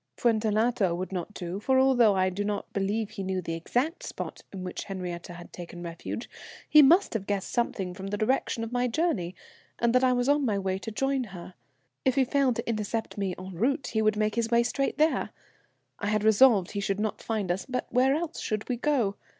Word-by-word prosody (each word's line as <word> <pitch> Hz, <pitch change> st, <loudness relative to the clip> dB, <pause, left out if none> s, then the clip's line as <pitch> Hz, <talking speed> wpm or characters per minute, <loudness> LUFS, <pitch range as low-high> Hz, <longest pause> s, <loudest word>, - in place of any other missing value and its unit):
"Fuentellato 220 Hz, -3 st, +2 dB
would 185 Hz, +2 st, -4 dB
not 185 Hz, +1 st, -4 dB
do, 180 Hz, +1 st, -4 dB
for 260 Hz, +5 st, +2 dB
although 245 Hz, -6 st, +5 dB
I 185 Hz, 0 st, +2 dB
do 200 Hz, +3 st, -2 dB
not 205 Hz, 0 st, -3 dB
believe 205 Hz, +2 st, -1 dB
he -, -, -6 dB
knew 190 Hz, -1 st, -1 dB
the 165 Hz, -2 st, -4 dB
exact 245 Hz, -, -1 dB
spot -, -, -6 dB
in 190 Hz, -2 st, -6 dB
which 180 Hz, -, -5 dB
Henriette 180 Hz, -3 st, -5 dB
had 175 Hz, -1 st, -11 dB
taken 175 Hz, 0 st, -8 dB
refuge, 170 Hz, +7 st, -6 dB, 0.4 s
he 305 Hz, -, +8 dB
must 335 Hz, +8 st, +5 dB
have 205 Hz, -4 st, -3 dB
guessed 200 Hz, -2 st, -2 dB
something 195 Hz, -6 st, -1 dB
from 190 Hz, +1 st, -7 dB
the 205 Hz, +1 st, -2 dB
direction 230 Hz, +1 st, 0 dB
of 230 Hz, -, -5 dB
my 245 Hz, 0 st, +1 dB
journey, 230 Hz, -, -1 dB, 0.4 s
and 235 Hz, 0 st, +2 dB
that 255 Hz, +1 st, +4 dB
I 255 Hz, -, +5 dB
was 245 Hz, 0 st, +1 dB
on 290 Hz, 0 st, +3 dB
my 215 Hz, -6 st, +1 dB
way 190 Hz, -1 st, -1 dB
to 225 Hz, -, -6 dB
join 270 Hz, +3 st, 0 dB
her. 185 Hz, -3 st, -10 dB, 0.5 s
If 260 Hz, -2 st, +2 dB
he 270 Hz, -1 st, +4 dB
failed 270 Hz, -2 st, +2 dB
to 235 Hz, -, -4 dB
intercept 220 Hz, 0 st, -2 dB
me 190 Hz, -3 st, -1 dB
en 185 Hz, +1 st, -8 dB
route, 265 Hz, -, 0 dB
he 220 Hz, -, +2 dB
would 215 Hz, -1 st, +2 dB
make 215 Hz, 0 st, +1 dB
his 230 Hz, 0 st, 0 dB
way 235 Hz, 0 st, +4 dB
straight 275 Hz, +3 st, -1 dB
there. 310 Hz, +1 st, +2 dB, 0.7 s
I 200 Hz, -, -2 dB
had 215 Hz, 0 st, +1 dB
resolved 220 Hz, -3 st, +5 dB
he 205 Hz, -, -3 dB
should 200 Hz, 0 st, -1 dB
not 215 Hz, 0 st, -2 dB
find 210 Hz, -5 st, -1 dB
us, 185 Hz, +7 st, -3 dB
but 250 Hz, -1 st, -2 dB
where 260 Hz, +2 st, +4 dB
else 330 Hz, +1 st, -3 dB
should 215 Hz, -1 st, -3 dB
we 250 Hz, -, -1 dB
go? 240 Hz, -7 st, +1 dB
215 Hz, 220 wpm, -28 LUFS, 190-250 Hz, 0.7 s, he